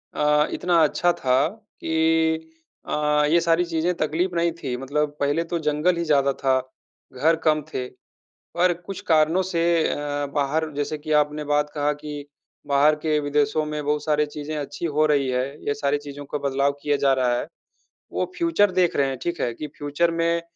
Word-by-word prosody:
अ, 150 Hz, 0 st, +3 dB
इतना 175 Hz, -1 st, 0 dB
अच्छा 175 Hz, +3 st, +2 dB
था 130 Hz, +2 st, +3 dB
कि 160 Hz, -5 st, -1 dB, 0.3 s
अ, 150 Hz, 0 st, +1 dB
ये 170 Hz, -, +5 dB
सारी 170 Hz, +1 st, +2 dB
चीज़ें 170 Hz, +1 st, 0 dB
तकलीफ़ 175 Hz, +4 st, -1 dB
नहीं 170 Hz, 0 st, +2 dB
थी, 130 Hz, -4 st, -3 dB
मतलब 145 Hz, +3 st, -2 dB
पहले 145 Hz, +3 st, +1 dB
तो 170 Hz, -, +1 dB
जंगल 155 Hz, +4 st, +1 dB
ही 170 Hz, -, -1 dB
ज़्यादा 140 Hz, -3 st, +3 dB
था, 130 Hz, -1 st, +3 dB, 0.5 s
घर 155 Hz, +6 st, +3 dB
कम 155 Hz, 0 st, +3 dB
थे। 125 Hz, -1 st, -3 dB, 0.7 s
पर 175 Hz, +1 st, +3 dB
कुछ 195 Hz, 0 st, -6 dB
कारणों 160 Hz, +3 st, +4 dB
से 165 Hz, -1 st, +1 dB, 0.2 s
अ, -, -, -1 dB, 0.4 s
बाहर 150 Hz, +2 st, 0 dB
जैसे 145 Hz, +1 st, -2 dB
कि 155 Hz, +1 st, -7 dB
आपने 150 Hz, +1 st, -7 dB
बात 150 Hz, 0 st, +1 dB
कहा 145 Hz, 0 st, +1 dB
कि 150 Hz, -1 st, -8 dB, 0.4 s
बाहर 145 Hz, +2 st, +4 dB
के 155 Hz, -1 st, +2 dB
विदेशों 145 Hz, +1 st, +1 dB
में 150 Hz, 0 st, -4 dB
बहुत 150 Hz, 0 st, 0 dB
सारी 150 Hz, -1 st, +2 dB
चीज़ें 150 Hz, +1 st, -6 dB
अच्छी 145 Hz, +3 st, -5 dB
हो 155 Hz, -1 st, +2 dB
रही 140 Hz, -3 st, +2 dB
हैं, 125 Hz, 0 st, 0 dB, 0.2 s
ये 145 Hz, -, +2 dB
सारी 145 Hz, 0 st, 0 dB
चीज़ों 145 Hz, 0 st, -8 dB
का -, -, -1 dB
बदलाव 140 Hz, +1 st, +1 dB
किया 145 Hz, 0 st, +1 dB
जा 135 Hz, -1 st, +5 dB
रहा 125 Hz, -2 st, +1 dB
है। -, -, -5 dB, 0.7 s
वो -, -, -2 dB
फ्यूचर 335 Hz, -, +3 dB
देख 180 Hz, -2 st, +2 dB
रहे 140 Hz, -, +2 dB
हैं, 135 Hz, -1 st, -3 dB
ठीक 175 Hz, 0 st, -3 dB
है, 120 Hz, -, -1 dB
कि 150 Hz, +6 st, -6 dB
फ्यूचर 145 Hz, +4 st, 0 dB
में 170 Hz, 0 st, +1 dB
150 Hz, 185 wpm, -23 LUFS, 145-165 Hz, 0.7 s, ये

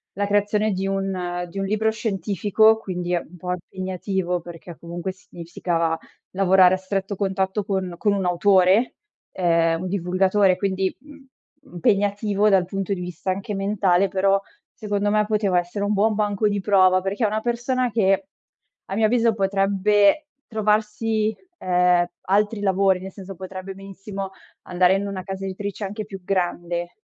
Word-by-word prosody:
la 205 Hz, +2 st, 0 dB
creazione 205 Hz, +1 st, +1 dB
di 190 Hz, 0 st, -2 dB
un 185 Hz, -2 st, -2 dB
di 195 Hz, -, -6 dB
un 195 Hz, -, -1 dB
libro 215 Hz, +2 st, +1 dB
scientifico, 210 Hz, +1 st, +2 dB
quindi 180 Hz, -4 st, -4 dB
è -, -, +3 dB
un 170 Hz, -, -14 dB
po' 180 Hz, +1 st, -5 dB
impegnativo, 185 Hz, 0 st, -3 dB
perché 170 Hz, 0 st, -11 dB
comunque 170 Hz, +2 st, -5 dB
significava 170 Hz, -2 st, -3 dB, 0.3 s
lavorare 185 Hz, -1 st, +5 dB
a -, -, -4 dB
stretto 195 Hz, +1 st, -3 dB
contatto 190 Hz, +1 st, -1 dB
con 190 Hz, -3 st, -2 dB
con 205 Hz, +3 st, +1 dB
un 195 Hz, -1 st, -1 dB
autore, 185 Hz, +5 st, +3 dB, 0.4 s
ehm, 165 Hz, -2 st, +2 dB
un 185 Hz, -, -3 dB
divulgatore, 185 Hz, +1 st, +2 dB
quindi, 190 Hz, 0 st, -1 dB
mhmm, 290 Hz, -1 st, -15 dB, 0.5 s
impegnativo 205 Hz, +2 st, +1 dB
dal 190 Hz, -3 st, +4 dB
punto 195 Hz, +1 st, -3 dB
di 185 Hz, -, -4 dB
vista 180 Hz, +1 st, -5 dB
anche 195 Hz, +2 st, -4 dB
mentale, 195 Hz, -2 st, +2 dB
però, 195 Hz, +1 st, +2 dB, 0.3 s
secondo 205 Hz, -1 st, -1 dB
me, 210 Hz, 0 st, +2 dB
poteva 205 Hz, -4 st, +1 dB
essere 175 Hz, +4 st, -4 dB
un 205 Hz, -, 0 dB
buon 210 Hz, +1 st, +2 dB
banco 210 Hz, 0 st, +1 dB
di 205 Hz, -1 st, -1 dB
prova. 185 Hz, -2 st, +4 dB
Perché 195 Hz, +5 st, -1 dB
è -, -, +4 dB
una 215 Hz, +1 st, -1 dB
persona 240 Hz, +1 st, -1 dB
che, 195 Hz, -3 st, +2 dB, 0.6 s
a 195 Hz, -, -5 dB
mio 220 Hz, +1 st, +3 dB
avviso, 230 Hz, 0 st, +3 dB
potrebbe 200 Hz, +5 st, +2 dB, 0.2 s
trovarsi, 215 Hz, 0 st, 0 dB, 0.3 s
ehm, 180 Hz, -1 st, +3 dB, 0.2 s
altri 205 Hz, +3 st, +1 dB
lavori, 195 Hz, -1 st, +2 dB
nel 190 Hz, +1 st, -8 dB
senso 195 Hz, -1 st, -9 dB
potrebbe 185 Hz, +1 st, -7 dB
benissimo 195 Hz, 0 st, -7 dB, 0.3 s
andare 180 Hz, +1 st, +3 dB
in 200 Hz, +1 st, -2 dB
una 195 Hz, -2 st, -5 dB
casa 195 Hz, +1 st, -5 dB
editrice 200 Hz, +2 st, -5 dB
anche 210 Hz, +2 st, -5 dB
più 195 Hz, -2 st, -9 dB
grande, 175 Hz, -2 st, -2 dB
195 Hz, 155 wpm, -23 LUFS, 185-205 Hz, 0.6 s, lavorare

